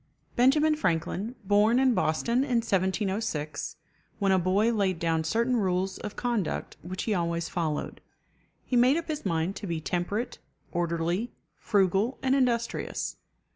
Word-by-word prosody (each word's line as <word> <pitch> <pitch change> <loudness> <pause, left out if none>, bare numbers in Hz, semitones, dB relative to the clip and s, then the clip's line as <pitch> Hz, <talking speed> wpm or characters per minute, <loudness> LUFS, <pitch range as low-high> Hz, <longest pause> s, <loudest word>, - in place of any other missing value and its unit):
Benjamin 300 +5 +4
Franklin, 195 - -1
born 205 +4 +4
in 260 -1 +4
Boston 185 +5 +1
in 260 -1 +1
1706, 190 -5 -1 0.4
when 200 -2 +2
a 190 - +4
boy 200 +6 +2
laid 195 -5 +1
down 165 -1 0
certain 235 +9 +1
rules 190 -2 0
of 210 - -6
conduct 235 -8 -2
which 185 +2 -5
he 220 - 0
always 170 -2 -1
followed. 160 -4 -3 0.6
He 255 - -1
made 250 +5 +5
up 335 - -4
his 300 -9 -2
mind 165 +2 0
to 205 - -6
be 165 -2 -2
temperate, 180 +8 -2 0.3
orderly, 175 +5 -1 0.3
frugal, 200 +4 +2
and 265 0 +3
industrious. 240 -3 0
200 Hz, 140 wpm, -28 LUFS, 175-235 Hz, 0.6 s, made